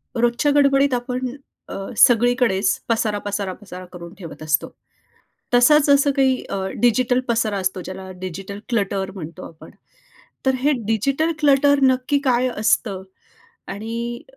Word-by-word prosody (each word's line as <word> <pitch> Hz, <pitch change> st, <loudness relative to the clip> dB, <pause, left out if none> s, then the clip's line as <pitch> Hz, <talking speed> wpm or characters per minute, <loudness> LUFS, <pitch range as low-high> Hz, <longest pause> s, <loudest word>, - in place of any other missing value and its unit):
रोजच्या 240 Hz, +4 st, +1 dB
गडबडीत 275 Hz, -1 st, +3 dB
आपण 250 Hz, +1 st, -2 dB, 0.4 s
अ, -, -, -6 dB, 0.2 s
सगळीकडेच 235 Hz, -5 st, +3 dB
पसारा, 220 Hz, -2 st, 0 dB
पसारा, 205 Hz, -2 st, -3 dB
पसारा 185 Hz, -2 st, -11 dB
करून 170 Hz, 0 st, -10 dB
ठेवत 165 Hz, -4 st, -10 dB
असतो. 155 Hz, 0 st, 0 dB, 0.8 s
तसाच 285 Hz, +4 st, +5 dB
असं 280 Hz, 0 st, +4 dB
काही 265 Hz, -1 st, +2 dB
अ, 195 Hz, -, -3 dB, 0.2 s
डिजिटल 250 Hz, +1 st, +2 dB
पसारा 225 Hz, -3 st, 0 dB
असतो, 190 Hz, -1 st, -2 dB
ज्याला 190 Hz, +1 st, -8 dB
डिजिटल 190 Hz, +2 st, -7 dB
क्लटर 195 Hz, -4 st, -1 dB
म्हणतो 175 Hz, 0 st, -8 dB
आपण. 160 Hz, -, -15 dB, 0.8 s
तर 265 Hz, -, +3 dB
हे 290 Hz, +3 st, +2 dB
डिजिटल 275 Hz, +9 st, 0 dB
क्लटर 285 Hz, 0 st, +4 dB
नक्की 260 Hz, +2 st, +2 dB
काय 255 Hz, -1 st, +2 dB
असतं? 210 Hz, -2 st, 0 dB, 0.7 s
आणि 235 Hz, +3 st, -5 dB
235 Hz, 130 wpm, -21 LUFS, 195-260 Hz, 0.8 s, तसाच